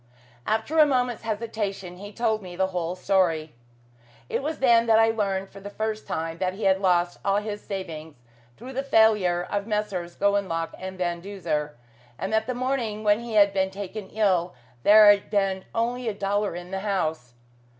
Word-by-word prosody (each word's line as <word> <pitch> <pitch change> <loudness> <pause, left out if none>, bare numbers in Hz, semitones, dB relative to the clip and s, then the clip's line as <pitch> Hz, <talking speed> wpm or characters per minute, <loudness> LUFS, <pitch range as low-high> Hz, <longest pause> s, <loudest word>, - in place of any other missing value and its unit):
After 225 +9 0
a 305 - +9
moment's 250 -4 0
hesitation 210 -5 -4
he 205 +2 -9
told 220 0 0
me 180 -2 -9
the 190 +1 0
whole 175 0 -2
story. 180 -5 +1 0.8
It - - -1
was 305 +2 -3
then 235 -3 +4
that 220 -1 +5
I 225 0 +5
learned 195 -3 -2
for 195 - -11
the 200 +1 -8
first 215 +1 -4
time 165 +1 -3
that 185 0 -1
he 215 - -7
had 190 0 +3
lost 175 -2 +2
all 195 0 +2
his 210 0 -4
savings 160 -6 -6 0.4
through 255 +4 -9
the 265 - -1
failure 215 -9 +3
of 205 0 -3
Messrs. 200 -5 -2
Gowanlock 190 -5 0
and 190 0 -7
Van 175 -1 -2
Duzer, 165 -6 -3 0.4
and 195 +3 -4
that 220 0 +1
the 255 - -2
morning 245 -4 -2
when 210 0 +3
he 235 -2 -6
had 200 -1 +5
been 190 -1 +1
taken 200 +1 -7
ill 185 -5 +1 0.3
there 210 - +8
had 205 -1 +5
been 195 -2 0
only 240 +2 -1
a 215 - -1
dollar 200 -1 -1
in 175 +1 -8
the 190 - -2
house. 160 - -2
200 Hz, 185 wpm, -25 LUFS, 185-220 Hz, 0.8 s, a